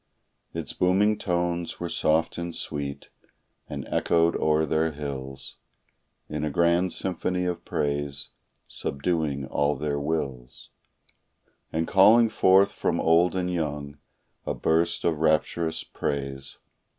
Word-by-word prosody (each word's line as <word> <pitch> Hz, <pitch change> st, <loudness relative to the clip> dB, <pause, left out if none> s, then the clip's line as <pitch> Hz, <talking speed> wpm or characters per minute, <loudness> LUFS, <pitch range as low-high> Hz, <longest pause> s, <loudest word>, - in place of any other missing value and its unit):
Its -, -, -5 dB
booming 100 Hz, +4 st, +3 dB
tones 85 Hz, -2 st, -2 dB
were 85 Hz, -, -3 dB
soft 80 Hz, 0 st, +1 dB
and 85 Hz, -1 st, -4 dB
sweet, 70 Hz, -1 st, -5 dB, 0.6 s
and -, -, -5 dB
echoed 85 Hz, 0 st, +2 dB
o'er 80 Hz, 0 st, +2 dB
their 80 Hz, +1 st, 0 dB
hills 70 Hz, -2 st, -6 dB, 0.7 s
In 75 Hz, 0 st, -4 dB
a 75 Hz, -, 0 dB
grand 85 Hz, +4 st, +2 dB
symphony 90 Hz, 0 st, -2 dB
of 90 Hz, -1 st, -3 dB
praise, 70 Hz, -1 st, -2 dB, 0.4 s
subduing 70 Hz, -2 st, -2 dB
all 70 Hz, +2 st, 0 dB
their 70 Hz, +1 st, -2 dB
wills, 70 Hz, -5 st, -4 dB, 1.0 s
And 80 Hz, +1 st, -1 dB
calling 110 Hz, +4 st, +6 dB
forth 95 Hz, -1 st, +4 dB
from -, -, -1 dB
old 85 Hz, +3 st, +3 dB
and 90 Hz, -1 st, -1 dB
young 75 Hz, -3 st, -3 dB, 0.4 s
a -, -, -3 dB
burst 85 Hz, +1 st, +1 dB
of 80 Hz, -3 st, +1 dB
rapturous 80 Hz, +1 st, +1 dB
praise. 70 Hz, -1 st, -4 dB
80 Hz, 120 wpm, -26 LUFS, 70-85 Hz, 1.0 s, calling